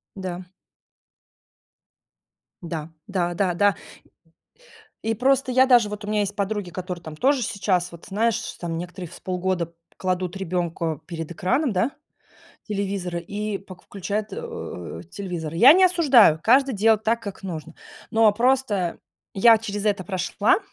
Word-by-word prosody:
Да. 185 -1 -5 2.2
Да. 160 -2 -5 0.2
Да, 175 -3 -1
да, 185 -1 +1
да. 205 +2 +3 1.3
И 225 0 0
просто 265 +3 +2
я 260 +1 +5
даже 240 -4 +5
вот 210 0 -7
у 205 - -6
меня 210 0 +1
есть 205 0 -2
подруги, 200 -2 -2
которые 180 -1 -6
там 160 -1 -9
тоже 265 - +2
сейчас, 185 -4 0
вот 170 - -12
знаешь, 220 +2 +1 0.2
там, 170 -2 -3
некоторые 180 +1 -6
в - - -13
с - - -13
полгода 180 -2 -2 0.2
кладут 185 0 -2
ребенка 170 -4 -2
перед 165 -2 -6
экраном, 230 - 0
да, 215 +8 +1 0.7
телевизора, 195 -4 -3
и 205 +3 -4
пок 185 -2 -13
включают, 205 +2 -4
э, 465 0 -7
телевизор. 175 -6 -5
Я 240 - +9
не 370 +3 +5
осуждаю, 275 - +5
каждый 265 +2 +4
делает 220 +1 +3
так, 230 +1 +1
как 200 -3 -7
нужно. 165 -5 -6 0.4
Но 225 -1 +5
просто 230 -6 +1 0.4
я 225 +3 +6
через 205 -1 -4
это 200 -3 0
прошла 195 - +1
200 Hz, 145 wpm, -24 LUFS, 180-225 Hz, 2.2 s, Я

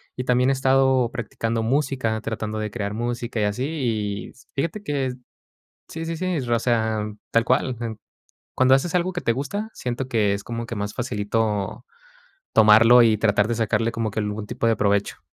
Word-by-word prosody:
Y 125 - -3
también 125 +1 +2
he - - +3
estado 130 -2 +3
practicando 115 -1 -3
música, 130 -3 0
tratando 110 -1 -4
de 105 -1 -3
crear 105 -3 -3
música 120 0 -3
y - - +2
así. 105 +5 -1
Y 110 -9 -2 0.2
fíjate 165 +9 -2
que 140 -6 -1 0.8
sí, 165 0 -6
sí, 165 - -3
sí. 185 0 -1
O 120 -1 +2
sea 110 -2 +1 0.3
tal 115 0 +3
cual. 130 0 +1
En 115 -2 -4 0.6
cuando 130 +1 +5
haces 160 +6 0
algo 180 +1 0
que 175 - -3
te - - +1
gusta, 145 - -3
siento 125 +1 -4
que 105 -5 +2
es 100 - -5
como 115 0 -5
que 115 - -5
más 105 0 -3
facilito, 105 -1 -2 0.7
tomarlo 110 +3 +7
y 110 -2 +4
tratar 105 -1 +2
de 120 - 0
sacarle 115 +1 0
como 115 -2 -2
que 110 - -3
algún 105 0 -3
tipo 120 0 -3
de 115 - +3
provecho. 100 -1 0
115 Hz, 185 wpm, -23 LUFS, 110-130 Hz, 0.8 s, tomarlo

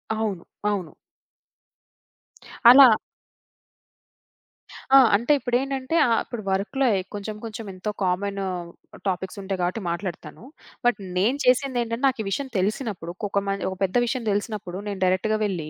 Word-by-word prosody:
అవును. 210 -5 -2 0.3
అవును. 190 -6 -2 1.8
అలా 265 +2 +10 2.1
ఆ! - - +11 0.2
అంటే 235 +8 +1
ఇప్పుడేంటంటే, 265 +3 -1
ఆ! - - 0
ఇప్పుడు 240 -3 -7
వర్క్‌లో 200 +8 0 0.3
కొంచేం 210 +1 -5
కొంచేం 225 -1 -7
ఎంతో 185 +3 -4
కామను 195 +2 -1 0.6
టాపిక్సుంటాయి 190 +1 -3
కాబట్టి 180 +6 -1
మాట్లాడతాను. 175 +4 -6 0.4
బట్ 245 -4 +3 0.2
నేను 225 +9 +2
చేసిందేంటంటే, 250 -2 +1
నాకు 260 -3 0
ఈ - - -9
విషయం 275 +8 -2
తెలిసినప్పుడు 195 -3 -2
ఒక్కొక 200 0 -1
మ 195 - 0
ఓ - - -5
పెద్ద 190 -1 -1
విషయం 245 +1 -2
దెలిసినప్పుడు 205 -3 -3
నేను 200 -2 -4
డైరెక్ట్‌గా 185 +4 +1
వెళ్ళి, 175 -7 -3
205 Hz, 120 wpm, -24 LUFS, 190-240 Hz, 2.1 s, ఆ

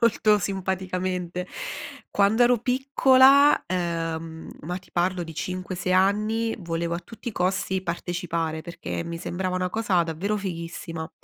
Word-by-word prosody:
molto 215 -2 +4
simpaticamente. 185 -1 -2 0.6
Quando 205 +4 +4
ero 245 0 +5
piccola, 265 +3 +5
ehm, 165 -2 -3
ma 175 +4 -3
ti 190 - -22
parlo 180 +1 +1
di 165 -1 -7
5,6 185 +1 -2
anni, 215 +4 +2
volevo 170 -1 -2
a - - -2
tutti 220 +6 -8
i 230 - -5
costi 190 +1 0
partecipare, 170 -2 -2
perché 170 0 -5
mi 170 0 -5
sembrava 180 +2 -3
una 185 0 -1
cosa 205 -5 +2
davvero 170 +6 -2
fighissima. 165 -4 -5
185 Hz, 135 wpm, -25 LUFS, 170-205 Hz, 0.6 s, ero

